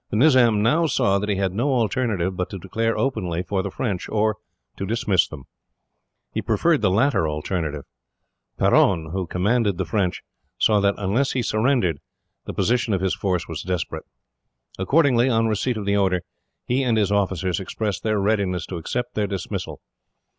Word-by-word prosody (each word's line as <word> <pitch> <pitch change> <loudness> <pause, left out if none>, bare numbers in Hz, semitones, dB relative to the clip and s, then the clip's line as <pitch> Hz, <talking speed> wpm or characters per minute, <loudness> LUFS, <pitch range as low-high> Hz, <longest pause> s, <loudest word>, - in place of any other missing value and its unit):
The 110 - -1
Nizam 120 -6 +5
now 160 +9 +3
saw 100 -8 +2
that 105 +1 -3
he 100 - +1
had 95 -1 -1
no 130 +7 0
alternative 110 -6 0
but 90 0 -3
to 100 - -6
declare 115 +5 -2
openly 90 -10 -1
for 95 +1 -1
the - - -4
French, 100 -8 -3
or 110 0 +1 0.4
to - - -4
dismiss 105 -5 +2
them. 75 -4 -10 0.9
He - - -1
preferred 165 -3 +2
the 105 - +3
latter 110 - +2
alternative. 75 -1 -3 0.7
Peron, 80 -5 +3
who 95 0 -3
commanded 100 +2 +1
the - - -1
French, 95 -5 -1 0.3
saw 105 -2 +3
that 100 0 +2
unless 105 +8 0
he 125 - 0
surrendered, 110 - +1 0.5
the - - -5
position 120 -3 +1
of 95 - -2
his 95 -1 +1
force 90 -3 -1
was 80 -3 -5
desperate. 90 -2 -3 0.7
Accordingly, 130 +2 +3
on 115 -2 +2
receipt 110 +2 0
of 105 - -4
the 100 0 +2
order, 95 -3 +1 0.4
he 125 +2 +1
and 120 -4 +1
his 100 -2 +1
officers 95 -3 0
expressed 100 +1 -3
their 110 -1 0
readiness 100 -4 0
to 90 - -6
accept 120 +9 -3
their 105 -1 0
dismissal. 95 -3 -5
100 Hz, 175 wpm, -23 LUFS, 95-115 Hz, 0.9 s, Nizam